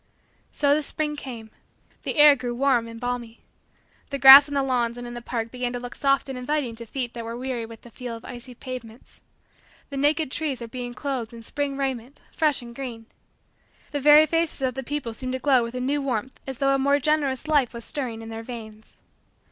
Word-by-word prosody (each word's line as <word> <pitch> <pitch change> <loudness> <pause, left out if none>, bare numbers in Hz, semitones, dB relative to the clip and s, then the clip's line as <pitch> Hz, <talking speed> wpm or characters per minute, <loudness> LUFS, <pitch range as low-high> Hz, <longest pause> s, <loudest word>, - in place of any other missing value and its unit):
So 285 -1 +3
the 305 - +2
spring 300 0 -3
came. 235 -6 -8 0.5
The - - -3
air 295 -1 +8
grew 245 -2 -4
warm 250 -3 +2
and 230 0 -9
balmy. 245 -2 -4 0.7
The 280 - -2
grass 275 +2 +11
on 285 - -5
the 275 - +2
lawns 245 -3 0
and 245 - -7
in 240 - -7
the 240 - -6
parks 230 -1 -4
began 250 -1 -3
to 245 - -3
look 245 0 -7
soft 275 -1 +1
and 270 - -5
inviting 270 -2 -1
to 235 0 -7
feet 245 0 -4
that 235 - -6
were 230 +1 -5
weary 250 -2 -3
with 225 -1 -12
the 240 - -15
feel 245 0 -6
of 230 - -11
icy 245 0 -9
pavements. 245 -2 -9 0.7
The 275 - -4
naked 295 +1 +1
trees 290 -5 -1
were 235 - -5
being 245 0 -6
clothed 260 -6 -3
in 230 - -10
spring 280 +3 -3
raiment, 265 -1 -4
fresh 300 -6 +1
and 235 0 -11
green. 235 -4 -6 0.9
The 290 - -1
very 300 +2 +8
faces 330 -2 -1
of 255 -1 +1
the 265 - -4
people 265 -3 -4
seemed 255 +3 -5
to - - 0
glow 260 -1 +3
with 230 +1 -4
a - - -2
new 280 +3 0
warmth 260 -2 -3
as 265 -2 -4
though 275 +1 +2
a 275 - +2
more 280 +1 +3
generous 290 -1 0
life 290 -6 +3
was 235 -1 -9
stirring 240 -6 -4
in 225 - -8
their 225 0 -6
veins. 220 -2 -10
255 Hz, 220 wpm, -25 LUFS, 235-280 Hz, 0.9 s, grass